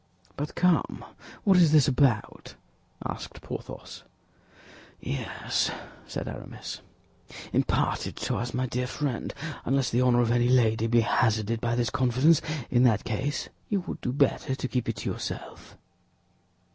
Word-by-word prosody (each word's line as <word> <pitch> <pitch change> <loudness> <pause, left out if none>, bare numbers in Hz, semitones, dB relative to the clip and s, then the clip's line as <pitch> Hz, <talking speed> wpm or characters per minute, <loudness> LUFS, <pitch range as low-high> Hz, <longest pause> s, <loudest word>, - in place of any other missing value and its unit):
"But 145 +1 -4
come, 180 -2 +1 0.4
what 195 -4 +5
is 165 -4 +6
this 150 -4 +6
about?" 130 -5 +1 0.5
asked - - -6
Porthos. - - -7 1.0
"Yes," 70 - -1 0.4
said - - -4
Aramis, - - -7 0.7
"impart - - +1
it - - -7
to - - -2
us, 120 +1 -3
my 130 0 -1
dear 125 0 -2
friend, 135 -2 -2 0.3
unless 135 -2 +1
the 120 - +2
honor 125 -1 +4
of 120 -1 +2
any 120 0 +3
lady 115 -3 +3
be 115 0 +4
hazarded 110 -1 +1
by 120 0 0
this 120 -1 0
confidence; 130 +6 +4 0.3
in 120 - +4
that 115 -5 +4
case 135 +7 -2 0.2
you 200 -3 +1
would 180 - -7
do 125 - -1
better 135 -1 +1
to 130 - -3
keep 125 -2 -1
it - - -1
to - - -4
yourself." - - -7
125 Hz, 145 wpm, -27 LUFS, 115-140 Hz, 1.0 s, is